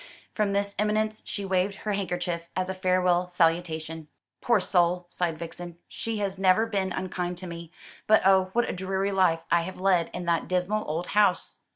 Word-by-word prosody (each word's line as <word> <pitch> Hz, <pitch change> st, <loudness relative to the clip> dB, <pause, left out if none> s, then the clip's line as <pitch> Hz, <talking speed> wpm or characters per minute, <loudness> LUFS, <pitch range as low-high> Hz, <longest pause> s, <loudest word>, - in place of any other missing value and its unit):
From 210 Hz, -2 st, 0 dB
this 200 Hz, 0 st, 0 dB
eminence 215 Hz, +1 st, 0 dB
she 200 Hz, -, -4 dB
waved 190 Hz, +1 st, 0 dB
her 210 Hz, 0 st, -3 dB
handkerchief 175 Hz, -3 st, -2 dB
as 185 Hz, 0 st, -1 dB
a -, -, -1 dB
farewell 180 Hz, -1 st, +1 dB
salutation. 165 Hz, -2 st, 0 dB, 0.3 s
"Poor 235 Hz, -3 st, +3 dB
soul!" 180 Hz, -1 st, +2 dB
sighed 170 Hz, -3 st, -2 dB
Vixen; 170 Hz, +1 st, -8 dB
"she 225 Hz, -1 st, -4 dB
has 195 Hz, -2 st, -3 dB
never 195 Hz, +3 st, +4 dB
been 195 Hz, -4 st, -1 dB
unkind 180 Hz, -1 st, -3 dB
to 185 Hz, -, -8 dB
me; 170 Hz, -1 st, -8 dB, 0.4 s
but 215 Hz, -, +5 dB
oh! 190 Hz, -1 st, +5 dB
what 240 Hz, 0 st, +2 dB
a -, -, -2 dB
dreary 190 Hz, +2 st, -1 dB
life 180 Hz, -4 st, +2 dB
I 170 Hz, -, +4 dB
have 185 Hz, +2 st, -7 dB
led 185 Hz, -3 st, +2 dB
in 180 Hz, -, -5 dB
that 170 Hz, -1 st, 0 dB
dismal 185 Hz, +4 st, 0 dB
old 165 Hz, +3 st, -2 dB
house!" 210 Hz, 0 st, +2 dB
185 Hz, 185 wpm, -27 LUFS, 175-200 Hz, 0.4 s, but